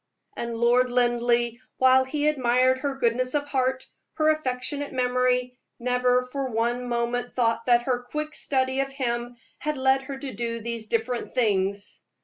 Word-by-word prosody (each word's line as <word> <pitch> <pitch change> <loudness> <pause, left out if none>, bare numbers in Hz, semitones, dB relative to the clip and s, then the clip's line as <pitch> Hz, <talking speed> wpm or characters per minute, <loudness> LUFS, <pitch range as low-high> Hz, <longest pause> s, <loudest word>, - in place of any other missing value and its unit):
And 235 0 -4
Lord 240 +2 +3
Linleigh, 240 -1 +1 0.2
while 260 0 +5
he 295 +3 -1
admired 255 -2 +3
her 280 0 -2
goodness 255 +2 0
of 290 -1 0
heart, 260 -1 0 0.3
her 310 0 +3
affectionate 280 0 -3
memory, 250 -1 0 0.2
never 250 +1 +1
for 270 +1 -3
one 240 +2 -1
moment 240 +1 -2
thought 230 -1 +1
that 240 -1 +4
her 245 -1 0
quick 300 +5 -5
study 260 -1 0
of 275 0 -1
him 240 -2 -2 0.2
had 300 -1 -2
led 265 0 +3
her 270 0 -7
to 270 -1 -6
do 230 +2 -3
these 230 -1 -5
different 235 +3 -2
things. 200 -4 0
250 Hz, 155 wpm, -25 LUFS, 235-260 Hz, 0.3 s, while